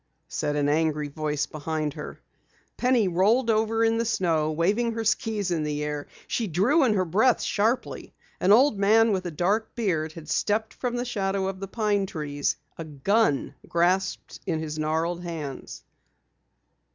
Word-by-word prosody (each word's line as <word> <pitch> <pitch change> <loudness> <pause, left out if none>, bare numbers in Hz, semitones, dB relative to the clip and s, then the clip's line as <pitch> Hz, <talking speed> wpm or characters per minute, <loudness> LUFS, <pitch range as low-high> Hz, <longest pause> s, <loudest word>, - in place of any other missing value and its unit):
said 150 -1 -2
an 145 -1 +1
angry 150 -1 +1
voice 150 0 -2
behind 155 -1 -3
her. - - -8 0.6
Penny 245 -5 +2
rolled 215 +7 +3
over 220 +1 +1
in 225 0 +2
the - - +2
snow, 165 -8 +1
waving 205 +9 +1
her 225 0 -3
skis 210 -3 0
in 165 -2 0
the 150 0 -2
air. 150 -1 -4 0.2
She 230 - -2
drew 210 - +3
in 225 -5 +3
her 185 -2 +1
breath 220 +9 +3
sharply. 225 +5 -1 0.3
An 185 - +3
old 230 -1 +5
man 220 +3 +5
with 185 -2 -1
a - - -4
dark 200 +8 0
beard 165 -9 -1
had 160 -2 -10
stepped 215 +5 0
from 245 -1 -3
the 245 +1 -2
shadow 195 -4 -1
of 190 -1 -4
the 195 - -5
pine 205 -1 0
trees, 145 -4 -2 0.2
a - - -3
gun 155 - +1 0.2
grasped 185 +2 0
in 165 -3 0
his 155 -1 -5
gnarled 160 +3 -1
hands! 160 -6 -6
185 Hz, 165 wpm, -26 LUFS, 155-220 Hz, 0.6 s, old